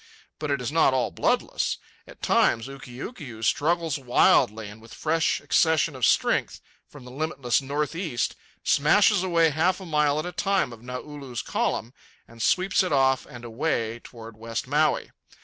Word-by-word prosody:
But 150 -1 -3
it 140 -2 0
is 125 - -2
not 155 -4 +3
all 130 - 0
bloodless. - - 0 0.3
At - - -15
times 115 - +2
Ukiukiu 135 - -9
struggles 160 +2 +1
wildly, 115 -4 +3
and 105 +2 -12
with 115 - -13
fresh 160 +1 +1
accessions 160 -2 +2
of 130 - +2
strength - - +1 0.3
from 140 -4 -14
the 125 - -10
limitless 140 -3 -1
north 145 +3 -2
east, 165 -9 -2 0.3
smashes 200 +7 +4
away 170 -3 +3
half 175 +6 +1
a 190 - -9
mile 150 -3 +1
at 155 - -2
a 180 - -4
time 190 -7 0
of 115 - -13
Naulu's 125 0 -7
column 120 +3 -2 0.3
and 115 0 -12
sweeps 185 - +2
it 185 - -1
off 135 -2 +2
and 120 0 -11
away 115 -2 -2
toward 115 -2 -11
West 115 +1 -4
Maui. 150 +4 +1
140 Hz, 165 wpm, -25 LUFS, 120-160 Hz, 0.3 s, smashes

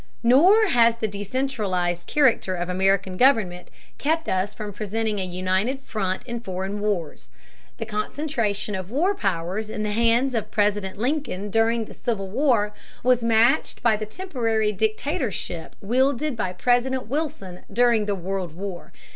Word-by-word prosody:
Nor 350 - +6
has 235 -5 +5
the 225 -1 -2
decentralized 200 -5 -2
character 255 -10 +2
of 175 0 -3
American 190 0 +1
government 210 -9 +2 0.3
kept 320 +2 0
us 190 +2 0
from 210 -1 -7
presenting 215 +1 -2
a - - -1
united 185 +8 -1
front 190 -7 -3
in 235 -1 -5
foreign 190 -1 -4
wars. 200 -7 -3 0.5
The 225 - -4
concentration 215 -1 -2
of 185 -1 -4
war 330 - +1
powers 195 - -2
in 215 - -3
the 210 - -1
hands 235 +4 +2
of 225 -3 -2
President 205 -2 0
Lincoln 235 -5 -2
during 225 +1 +2
the - - -11
Civil 205 -6 -3
War 220 -3 +2 0.3
was 250 -1 +3
matched 230 +4 +2
by 230 -2 +4
the 215 0 -5
temporary 225 - -1
dictatorship 215 - -2
wielded 260 +6 +1
by 190 -5 -2
President 250 +5 +1
Wilson 235 - -4
during 230 -1 +3
the 205 - 0
World 185 -2 -4
War. 185 -1 -7
215 Hz, 145 wpm, -24 LUFS, 195-245 Hz, 0.5 s, Nor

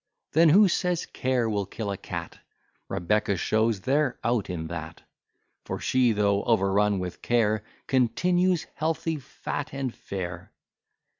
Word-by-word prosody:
Then 165 +1 +5
who 200 +6 +7
says 180 -1 0
care 125 -2 0
will 100 -3 -1
kill 105 0 -4
a - - -2
cat? 85 -2 -6 0.5
Rebecca 100 +2 0
shows 110 +2 +1
they're 135 +2 +1
out 115 -2 0
in 85 -3 -3
that. 80 0 -7 0.6
For - - -4
she, 130 -2 +3
though 100 -1 +2
overrun 100 -2 +3
with 90 -1 -5
care, 110 -3 +1 0.2
Continues 175 +8 +2
healthy, 160 +1 -1
fat, 145 +2 -5
and 135 -3 -2
fair. 90 -2 -6
110 Hz, 135 wpm, -26 LUFS, 100-140 Hz, 0.6 s, who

